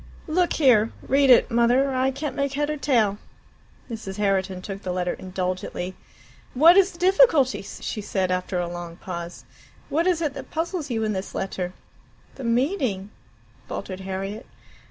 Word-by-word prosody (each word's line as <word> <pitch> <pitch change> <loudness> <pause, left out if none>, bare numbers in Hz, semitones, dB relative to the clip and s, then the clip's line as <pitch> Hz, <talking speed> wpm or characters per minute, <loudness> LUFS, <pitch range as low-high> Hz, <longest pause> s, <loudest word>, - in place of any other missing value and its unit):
"Look 345 +2 +1
here, 235 -7 +4 0.2
read 275 0 +4
it, 250 - +6
Mother; 245 +4 +3
I 260 +1 +2
can't 275 +2 -4
make 280 -1 -1
head 295 +2 0
or 300 - -3
tail." 220 -8 +2 0.7
Mrs. 215 -5 -6
Herriton 190 -2 0
took 195 0 -6
the 185 - -3
letter 180 0 -1
indulgently. 185 0 -4 0.6
"What 325 +7 +8
is 390 -1 +5
the - - -14
difficulty?" 360 - +4
she 200 +2 -6
said 190 -2 -1
after 180 0 -1
a 175 -1 -1
long 175 -1 -7
pause. 170 -1 -7 0.4
"What 330 +4 +1
is 360 -3 +2
it 305 -4 -1
that 275 -2 -8
puzzles 325 -1 -3
you 225 -2 -1
in 215 -1 0
this 190 0 -5
letter?" 185 -2 -3 0.6
"The 270 - -9
meaning 235 - 0 0.3
" 115 +3 -31
faltered 185 -1 -5
Harriet. 195 +3 -5
225 Hz, 165 wpm, -24 LUFS, 190-280 Hz, 0.7 s, What